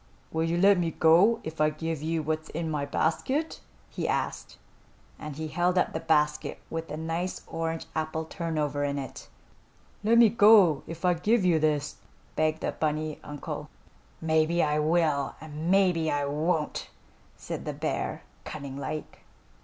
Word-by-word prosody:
"Will 160 0 0
you 165 +1 0
let 195 +1 +5
me 170 -1 +1
go 170 +9 +4
if 160 0 -5
I 155 - +5
give 160 0 -4
you 160 0 -1
what's 155 +1 -2
in 160 0 -3
my 145 -2 -2
basket?" 260 - -1 0.3
he - - -4
asked, - - -2 0.6
and 150 -2 -7
he 155 +1 -4
held 175 +3 +1
up - - +2
the 160 - -2
basket 150 -2 +1
with 165 0 -3
the 150 - -5
nice 165 +3 -3
orange 165 0 -3
apple 160 0 -2
turnover 155 -4 -2
in 140 0 -1
it. 135 -1 -7 0.7
"Let 225 +2 +4
me 235 -2 +8
go 205 -8 +6
if 165 +2 -6
I 180 - +5
give 205 +4 +2
you 170 -3 +4
this," 150 -1 0 0.4
begged 155 0 +1
the - - -1
bunny 155 0 -2
uncle. 145 -1 -6 0.5
"Maybe 160 +1 +2
I 150 0 +1
will, 155 -3 +1
and 155 +1 -5
maybe 180 -4 +3
I 145 -1 0
won't," 150 +2 -1 0.5
said - - -6
the - - -3
bear, - - -3 0.2
cunning 140 -3 -7
like. 155 +2 -5
160 Hz, 160 wpm, -28 LUFS, 150-170 Hz, 0.7 s, me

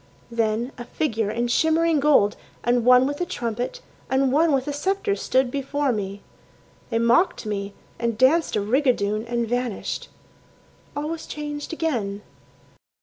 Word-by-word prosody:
Then 230 +2 0
a - - -4
figure 225 -7 -1
in 235 +3 -1
shimmering 320 +4 +3
gold, 275 -8 +4 0.3
and 240 0 +2
one 250 +1 +6
with 285 +4 -3
a - - +3
trumpet, 245 - -3 0.3
And 265 0 +2
one 315 +4 +4
with 270 -1 +1
a 290 - -1
sceptre 390 +7 0
stood 260 -7 +1
before 280 0 0
me. 200 -2 -4 0.7
They 230 - 0
mocked 235 - +3
me 200 -1 -4 0.2
and 235 -2 -1
danced 280 +7 +3
a 210 - +1
rigadoon 220 -2 +1
and 235 -1 -1
vanished.... 245 -2 -3 0.9
All 290 +1 -2
was 330 -1 -5
changed 295 -1 -5
again. 230 -12 -2
250 Hz, 145 wpm, -24 LUFS, 225-295 Hz, 0.9 s, one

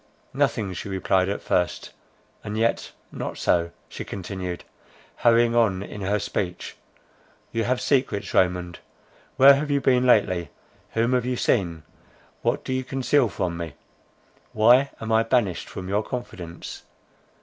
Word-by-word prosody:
"Nothing," 100 -4 0
she 95 - -6
replied 95 0 +1
at 100 - -3
first; 90 -2 -1 0.5
"and 105 +1 -4
yet 115 +1 0 0.2
not - - -5
so," 85 -1 +1 0.2
she - - -7
continued, 90 -2 -5 0.5
hurrying 120 0 +4
on 100 -5 +2
in 100 0 -8
her 100 +2 +1
speech; 90 -3 -4 0.8
"you 115 0 -1
have 125 0 +1
secrets, 130 -7 0
Raymond; 90 -1 +1 0.6
where 135 +1 +9
have 145 +2 -1
you 140 -1 +2
been 125 -1 +3
lately, 90 -8 +3 0.4
whom 115 +2 +1
have 125 -1 +1
you 125 - 0
seen, 85 -11 0 0.6
what - - 0
do 130 - -2
you 130 0 -1
conceal 130 -1 +1
from 90 -3 -3
me?—why 110 - 0
am 115 0 -4
I 110 0 +5
banished 115 -6 0
from 90 - -7
your 100 +2 +1
confidence? 95 -8 -7
105 Hz, 140 wpm, -24 LUFS, 90-125 Hz, 0.8 s, where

